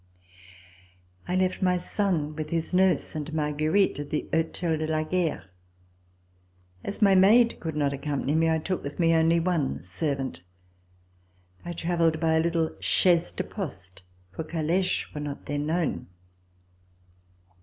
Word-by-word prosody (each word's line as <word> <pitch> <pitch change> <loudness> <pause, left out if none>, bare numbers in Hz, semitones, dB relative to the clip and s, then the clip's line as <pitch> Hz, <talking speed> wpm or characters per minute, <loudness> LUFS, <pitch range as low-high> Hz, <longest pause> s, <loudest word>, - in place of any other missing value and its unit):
I 180 - -1
left 185 0 0
my 180 -1 +3
son 175 -5 0
with 155 -1 -5
his 165 +2 -2
nurse 185 -2 +2
and 155 0 -4
Marguerite 155 +5 +1
at 145 - -5
the 150 - -2
Hotel 165 +1 0
de 155 0 -2
la 155 0 0
Guerre. 170 -1 -1 1.4
As 205 +2 -2
my 200 -1 +6
maid 220 +6 +5
could 160 -2 -4
not 145 -2 +1
accompany 140 0 -2
me, 165 +1 +3
I 160 - +2
took 180 +3 -3
with 140 0 -7
me 165 -1 +4
only 165 +1 +4
one 165 - -1
servant. 130 - -3 1.2
I 175 - -5
travelled 165 -1 +1
by 160 -1 +2
a 160 - +3
little 165 -1 0
chaise 175 -2 +2
de - - -3
poste, 95 - -7 0.3
for 160 - -5
caleches 170 +4 -1
were 150 - -5
not 145 -1 -6
then 145 +1 -2
known. 160 - -1
160 Hz, 145 wpm, -26 LUFS, 150-180 Hz, 1.4 s, my